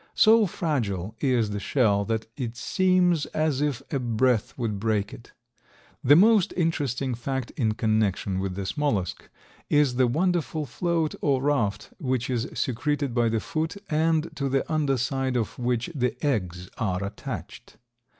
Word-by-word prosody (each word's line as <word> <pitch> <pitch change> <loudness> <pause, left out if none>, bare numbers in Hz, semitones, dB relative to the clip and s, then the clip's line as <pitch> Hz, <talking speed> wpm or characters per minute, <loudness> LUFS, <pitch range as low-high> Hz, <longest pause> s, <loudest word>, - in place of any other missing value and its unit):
So 220 -1 +6
fragile 110 - -2
is 120 -6 +1
the 105 - -3
shell 100 -4 +2
that 110 0 -2
it 120 -3 -5
seems 180 +1 +2
as 155 -3 +1
if 140 -3 -1
a 140 - +1
breath 120 -1 +1
would 110 -5 -2
break 105 -1 0
it. - - -12 0.7
The 145 +3 +7
most 205 +2 +5
interesting 140 -7 0
fact 125 +1 -3
in 110 -5 0
connection 105 -4 0
with 95 -1 -3
this 95 0 -4
mollusk 115 - -1 0.4
is 145 -4 +3
the 130 -1 +4
wonderful 160 +2 0
float 165 +3 -1
or 135 -3 +1
"raft" 110 -8 0
which 130 -4 -1
is 120 +2 -1
secreted 140 +1 -1
by 120 -1 +2
the 110 0 0
foot, 160 - -3
and 160 +1 +1
to 140 -1 -1
the 135 0 +1
under 145 -4 +1
side 130 0 -1
of 120 +4 -3
which 125 +5 -1
the 125 -5 -1
eggs 90 -9 -1
are 95 -4 -1
attached. 100 - -7
130 Hz, 155 wpm, -26 LUFS, 110-150 Hz, 0.7 s, The